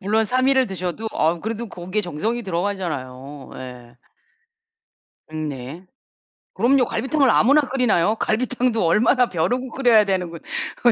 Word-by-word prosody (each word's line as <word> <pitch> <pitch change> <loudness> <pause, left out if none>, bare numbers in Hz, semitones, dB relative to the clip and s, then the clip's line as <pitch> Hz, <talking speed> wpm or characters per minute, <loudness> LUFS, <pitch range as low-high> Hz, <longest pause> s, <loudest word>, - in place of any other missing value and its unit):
물론 215 +3 +1
3 255 +4 +1
일을 265 -2 +3
드셔도 190 +3 -4
어 165 +1 +1
그래도 225 +1 -4
거기에 185 +3 -3
정성이 210 +7 -3
들어가잖아요. 155 - -4
예. 125 -2 -10 1.3
음 155 -1 -4
네. 140 +6 -8 0.7
그럼요. 260 - +3
갈비탕을 275 0 +1
아무나 285 +5 +5
끓이나요? 245 -8 +1
갈비탕도 240 -1 0
얼마나 235 - +3
벼르고 245 +9 -1
끓여야 235 -5 +4
되는 185 -3 -1
거 170 - -8 0.4
그거 240 - +3
210 Hz, 320 characters per minute, -22 LUFS, 165-245 Hz, 1.3 s, 아무나